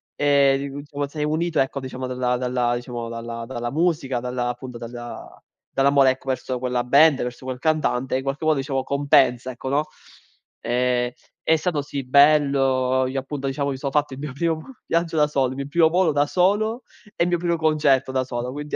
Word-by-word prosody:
Ehm, 140 -1 +2
insomma 145 0 -4
sei 150 +1 -4
unito 160 +1 0
ecco, 135 +1 -2
diciamo 130 0 -6
dalla 125 -1 -1
dalla 125 -1 0
diciamo 120 -1 -5
dalla 115 0 -6
dalla 120 -1 -4
musica, 150 -5 0
dalla 125 0 -2
appunto 125 0 -6
dalla 120 0 -9 0.3
dall'amore 135 0 +4
ecco 130 +1 -8
verso 130 -1 -2
quella 125 -1 -1
band, 140 +3 +5
verso 125 +1 -6
quel 130 -1 -4
cantante, 145 -5 0
in 130 - -4
qualche 135 +3 -3
modo 155 -2 +3
diciamo 135 -1 -2
compensa 135 -3 +2
ecco, 130 +1 -6
no. 145 +3 +1 0.8
Ehm, 125 0 0 0.3
è 160 - +5
stato 155 -2 -1
sì 140 -1 -5
bello, 135 -2 +3
io 135 +1 -2
appunto 135 +1 -6
diciamo 140 +1 -1
mi 135 - -3
sono 140 0 -3
fatto 150 -2 0
il - - -11
mio 145 -2 -5
primo 160 +2 -1 0.3
viaggio 165 0 0
da 150 -1 +4
solo, 135 -3 +1
il 130 - -6
mio 140 0 -4
primo 160 +2 +4
volo 175 0 +2
da 145 0 +2
solo 210 - +1 0.3
e - - +2
il - - -1
mio 175 - +2
primo 170 0 0
concerto 150 -4 +2
da 130 0 0
solo. 125 0 -4
Quindi 150 +2 -5
135 Hz, 195 wpm, -23 LUFS, 125-150 Hz, 0.8 s, band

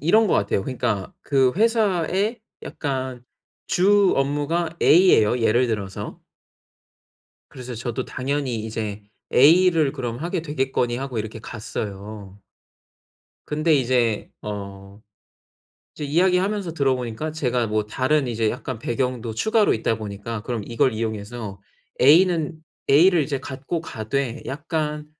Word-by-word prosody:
이런 215 - +4
것 - - +2
같아요. 100 -1 +1
그러니까 115 -6 -2
그 135 -3 +3
회사의 210 -1 +1 0.2
약간 130 -4 -4 0.4
주 200 +1 +4
업무가 145 +4 0
A에요, 135 - +5
예를 120 +3 +3
들어서. 100 -4 -4 1.3
그래서 125 -2 -8
저도 120 +2 -4
당연히 130 -2 -2
이제 110 -2 -4 0.3
A를 160 +1 +5
그럼 120 -4 -4
하게 170 +1 -3
되겠거니 135 -5 -1
하고 130 -3 -4
이렇게 110 +1 -5
갔어요. 105 -3 -7 1.1
근데 155 +1 +2
이제 120 -4 +1
어 100 -1 -7 0.9
이제 - - -7
이야기하면서 180 +3 +1
들어 135 -4 +2
보니까 125 +5 -4
제가 125 -6 0
뭐 105 0 0
다른 135 +5 +1
이제 115 -2 0
약간 125 -1 -5
배경도 120 -2 -2
추가로 220 - +3
있다 110 0 0
보니까 105 +1 -5
"그럼 115 -3 -4
이걸 120 +2 +1
이용해서 110 -2 -5 0.4
A는 165 +2 +4 0.3
A를 165 +4 +6
이제 140 -1 -2
갖고 140 +5 -4
가되 125 +1 -3
약간 150 +1 -3
130 Hz, 270 characters per minute, -23 LUFS, 110-155 Hz, 1.3 s, A를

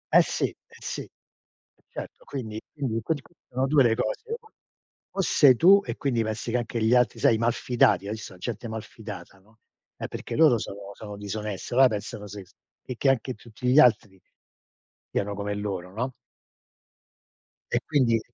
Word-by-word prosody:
Eh - - +10
sì, - - -2
eh - - -12 0.2
sì, - - -4
eh - - -11 0.8
certo - - -8
quindi 110 -6 -5
quindi 135 -6 -3
in 115 - -1
quel 150 +5 -1
caso 170 - -21
sono 130 +1 0
2 140 +1 +4
le 120 -3 +4
cose. 125 - -2 0.2
O 445 -2 -21 0.6
o 195 - +1
sei 140 -7 +6
tu 195 +8 +7
e - - -3
quindi 125 -5 0
pensi 110 +1 -3
che 125 - +2
anche 120 -1 -3
gli 110 +2 +4
altri 125 0 +3
sai - - +4
i - - 0
mal 115 +1 +3
fidati, 120 -4 +2
hai - - -3
visto 110 -2 -8
a - - -15
gente 115 +4 -5
malfidata, 105 -4 -8
no? 110 +4 -26 0.4
È - - -5
perché - - -6
loro 150 -7 +5
sono 100 -1 -7
sono 105 0 -9
disoneste, 105 -1 -5
allora 130 +2 +7
pensano 105 -2 -5
se 100 0 -8 0.4
e 125 - -5
che 135 - +2
anche 130 -1 +1
tutti 120 +1 -7
gli 130 +4 +6
altri 105 -7 +4 0.9
siano 100 0 -1
come 105 0 -3
loro, 95 -3 -4
no? 125 +5 -2 1.6
E - - +2
quindi 125 -7 +3
115 Hz, 185 wpm, -26 LUFS, 105-130 Hz, 1.6 s, Eh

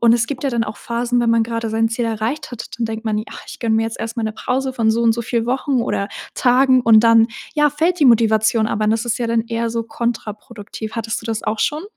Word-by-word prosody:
und 230 -1 +5
es 235 -1 +2
gibt 265 0 -5
ja 275 - 0
dann 235 -2 0
auch 215 - -7
Phasen, 240 +1 -1
wenn 235 -1 +2
man 230 -1 +3
gerade 230 -1 -3
sein 225 +1 +1
Ziel 230 +1 -2
erreicht 225 +7 -3
hat, 245 -3 -7
dann 235 - 0
denkt 225 +1 -6
man 215 -1 0
i 215 - -4
„Ach, - - -9
ich - - -10
gönne 225 -2 +1
mir 225 - +2
jetzt 225 - -5
erst 225 +1 -5
mal 230 - -1
'ne 220 - -2
Pause 260 +3 -2
von 225 -3 +1
so 230 +1 +1
und 230 -1 +4
so 235 +1 -3
viel 230 0 -1
Wochen 260 0 0
oder 200 -3 -2 0.3
Tagen.“ 255 +1 +4
Und 225 -1 +5
dann, 230 0 +5 0.3
ja, 295 -1 +3
fällt 330 +4 0
die 290 - +5
Motivation, 220 -1 +4
aber 215 -1 0
das 225 +2 +1
ist 240 0 -1
ja 235 -1 -2
dann 230 -1 +1
eher 230 0 -2
so 230 0 -2
kontraproduktiv. 225 -1 -5
Hattest 225 0 -3
du - - -8
das 225 -1 -3
auch 215 0 -2
schon? 300 +3 0
230 Hz, 270 wpm, -19 LUFS, 220-245 Hz, 0.3 s, und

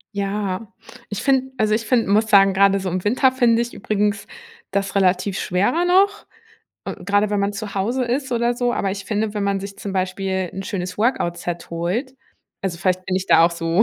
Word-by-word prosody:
Ja, 200 0 -3 0.4
ich 210 +2 -4
finde 265 -1 +2
also, 215 -2 +2
ich 225 +1 0
finde 240 -3 +2
muss 215 +2 +3
sagen, 195 -1 +6
grade 195 0 +4
so 190 - -4
im 180 +1 -3
Winter 255 +5 +3
finde 235 -2 +3
ich 240 - -8
übrigens 205 0 -1 0.4
das 195 -1 -2
relativ 190 0 +1
schwerer 225 - +1
noch, 395 +3 +3 0.6
äh, - - -4
grade, 205 +2 +2
wenn 205 - +1
man 200 +1 0
zu 205 0 -6
Hause 240 +7 0
ist 260 +2 -2
oder 240 0 +1
so. 245 0 0
Aber 195 -4 -1
ich 200 -1 -6
finde, 210 +1 -2
wenn 210 - -1
man 200 0 0
sich 195 0 -8
zum 200 - -6
Beispiel 190 0 -1
'n 195 - -5
schönes 185 -1 -4
Workout-Set 175 -7 -1
holt. 185 - -2 0.5
Also, 180 -3 -3
vielleicht 185 0 0
bin 185 - 0
ich 190 0 -3
da 165 - +6
auch 170 - +3
so 170 +3 +1
200 Hz, 205 wpm, -21 LUFS, 190-230 Hz, 0.6 s, sagen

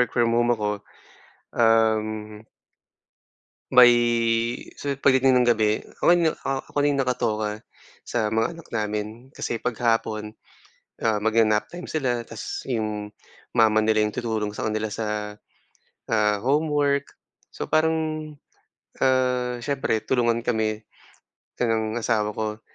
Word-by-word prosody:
work-from-home 120 0 +2
ako, 105 -1 -1 0.9
um 110 -2 +1 1.3
May 125 -1 +9 0.9
so 140 -1 -2
pagdating 130 -1 +4
ng 120 - +3
gabi 110 -2 +2 0.2
ako 175 - +5
na 170 -3 +2
ak 135 -1 -4
ako - - -7
na 145 0 +3
yung 140 - +1
nakatoka 115 -5 -1 0.5
sa 110 -3 -1
mga 110 +1 +1
anak 165 -1 -13
namin 105 -1 -2 0.3
kasi 120 - -3
'pag 125 +2 -2
hapon, 110 -2 0 0.7
ah, 110 -2 +2
magna-nap 110 -1 +2
time 175 0 -9
sila 125 -6 -1
tas 115 -2 -6
yung 105 -4 -3 0.4
mama 110 -2 +4
nila 110 0 +3
yung 105 0 -1
tutulong 110 -3 -2
sa - - -3
kanila 110 0 -1
sa, 105 -1 -4 0.7
ah, 105 -2 +2
homework. 145 +1 +1 0.4
So - - -6
parang, 160 +1 +3 1.1
ah, 125 -2 +1
siyempre, 135 -6 -1
tulungan 120 -2 +1
kami 110 -2 -1 0.8
ng 110 -1 0
asawa 110 -3 0
ko. 110 0 -3
115 Hz, 120 wpm, -24 LUFS, 110-125 Hz, 1.3 s, May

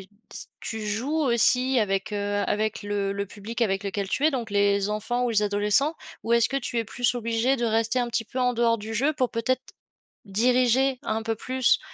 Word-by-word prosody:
t 190 - -18 0.5
tu 225 - -4
joues 225 +7 -2
aussi 250 +2 +3
avec, 195 -1 -1
heu, 205 0 -1
avec 215 0 -1
le 200 -1 -2
le 200 0 -3
public 210 +4 -8
avec 195 -3 0
lequel 200 0 -3
tu 280 - -1
es, 315 - +5
donc 245 -6 -3
les 200 0 +2
enfants 220 +4 -1
ou 245 - 0
les 215 -2 +2
adolescents? 210 +9 +2 0.3
Ou 230 - -1
est-ce 235 -1 +4
que 275 - -2
tu 245 -2 -2
es 230 - 0
plus 245 +3 0
obligée 230 +3 0
de 240 - -2
rester 225 +2 +1
un 240 -1 0
petit 235 -1 -1
peu 255 - -7
en 250 -1 +2
dehors 230 0 +2
du 220 +2 -6
jeu, 280 +7 +2
pour 255 -4 -1
peut-être 250 +2 -1 0.6
diriger 250 +5 +2
un 220 +1 -2
peu 225 0 -1
plus, 255 +2 +2
225 Hz, 210 wpm, -25 LUFS, 205-250 Hz, 0.6 s, es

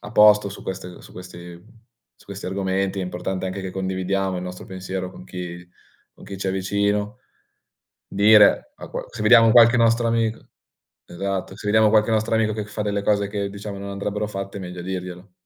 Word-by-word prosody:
a 105 - -9
posto 105 -2 +6
su 100 - -10
queste, 90 -1 -7
su - - -15
questi 90 -1 -11 0.6
su - - -21
questi 100 -1 -7
argomenti, 95 0 -1
è - - -2
importante 90 +1 -4
anche 95 +1 -4
che 95 -1 -5
condividiamo 95 0 -2
il - - -5
nostro 90 0 -7
pensiero 95 0 -5
con 90 - -13
chi 90 -1 -8 0.5
con - - -15
chi 100 -1 -8
ci 95 - -4
è 95 - 0
vicino, 100 +3 -1 0.9
dire, 105 +1 +5
a - - -10
qual - - -6
se - - -6
vediamo 115 +1 +7
qualche 120 0 +7
nostro 115 0 +3
amic 115 -1 0 0.7
esatto, 95 +1 -4
se 105 - -7
vediamo 110 +1 +4
qualche 110 +1 +3
nostro 110 +1 0
amico 110 -1 +1
che 105 0 -3
fa 105 0 -5
delle 100 -1 -2
cose 100 -1 +1
che 100 -1 -3
diciamo 100 0 -7
non 100 0 -7
andrebbero 100 +1 -3
fatte, 100 -1 -6
è - - -7
meglio 90 -1 -7
dirglielo. 90 0 -6
100 Hz, 195 wpm, -22 LUFS, 95-105 Hz, 0.9 s, vediamo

